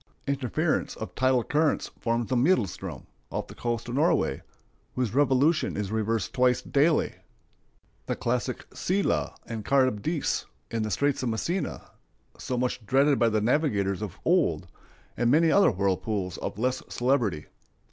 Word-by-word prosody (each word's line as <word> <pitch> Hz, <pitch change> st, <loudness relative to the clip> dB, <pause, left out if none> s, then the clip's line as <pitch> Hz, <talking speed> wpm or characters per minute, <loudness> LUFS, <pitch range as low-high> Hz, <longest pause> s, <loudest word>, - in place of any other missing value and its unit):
Interference 135 Hz, -7 st, -1 dB
of -, -, -7 dB
tidal 130 Hz, -1 st, +2 dB
currents 150 Hz, +3 st, +1 dB
forms 115 Hz, -1 st, 0 dB
the 130 Hz, -, -1 dB
Maelstrom, 125 Hz, -, 0 dB, 0.3 s
off -, -, -3 dB
the -, -, -12 dB
coast 120 Hz, 0 st, -3 dB
of 120 Hz, -, -5 dB
Norway, 155 Hz, -, +2 dB, 0.5 s
whose 125 Hz, -4 st, -1 dB
revolution 145 Hz, +2 st, +2 dB
is 105 Hz, -1 st, -3 dB
reversed 110 Hz, -2 st, -1 dB
twice 125 Hz, -1 st, +3 dB
daily, 150 Hz, +3 st, +1 dB, 0.9 s
the -, -, -1 dB
classic 125 Hz, +1 st, -2 dB
Scylla 195 Hz, +2 st, 0 dB
and 115 Hz, -2 st, -5 dB
Charybdis, 135 Hz, +4 st, +1 dB, 0.2 s
in 115 Hz, -, -1 dB
the 110 Hz, -, -1 dB
Straits 140 Hz, +5 st, +1 dB
of 125 Hz, -, -1 dB
Messina, 170 Hz, -, -3 dB, 0.4 s
so 125 Hz, -, -4 dB
much 125 Hz, -1 st, -1 dB
dreaded 135 Hz, +6 st, +3 dB
by 115 Hz, -, +4 dB
the 110 Hz, -1 st, +1 dB
navigators 105 Hz, -, +1 dB
of 100 Hz, -3 st, -5 dB
old, 150 Hz, -, +2 dB, 0.5 s
and 120 Hz, -1 st, +1 dB
many 160 Hz, +4 st, +4 dB
other 200 Hz, -, +6 dB
whirlpools 95 Hz, -1 st, -1 dB
of -, -, -4 dB
less 130 Hz, +3 st, 0 dB
celebrity. 120 Hz, -, 0 dB
125 Hz, 145 wpm, -27 LUFS, 110-140 Hz, 0.9 s, other